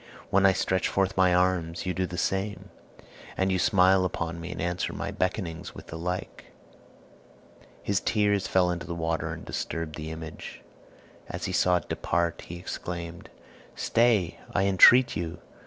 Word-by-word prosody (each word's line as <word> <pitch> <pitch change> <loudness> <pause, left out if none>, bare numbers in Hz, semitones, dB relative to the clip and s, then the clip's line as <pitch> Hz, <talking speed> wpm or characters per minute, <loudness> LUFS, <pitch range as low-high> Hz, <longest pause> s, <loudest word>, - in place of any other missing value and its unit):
When 95 0 +5
I 95 - +5
stretch 95 0 0
forth 95 -1 0
my 95 -1 +4
arms 90 -2 +1
you 90 - -1
do 95 0 -1
the 90 - -7
same; 95 +2 -2 0.7
and 95 0 +1
you 95 - +1
smile 95 0 +4
upon 85 -2 -3
me 85 +1 -6
and - - -7
answer 90 +2 -2
my - - -4
beckonings 90 -3 -3
with - - -10
the - - -9
like." 90 +2 -5 1.4
His 100 -1 +1
tears 100 -3 +1
fell 90 -1 +3
into 85 -3 -5
the 85 - -4
water 80 0 -2
and - - -7
disturbed 80 -2 -4
the 80 0 -6
image. 80 -1 -8 0.7
As - - -4
he - - -2
saw 90 0 +3
it 90 - -2
depart, 85 0 -1
he 85 - -7
exclaimed, 85 -1 -6 0.5
"Stay, 115 -7 +2 0.2
I 95 - +3
entreat 120 +6 +7
you! 85 0 -4
90 Hz, 165 wpm, -27 LUFS, 85-95 Hz, 1.4 s, entreat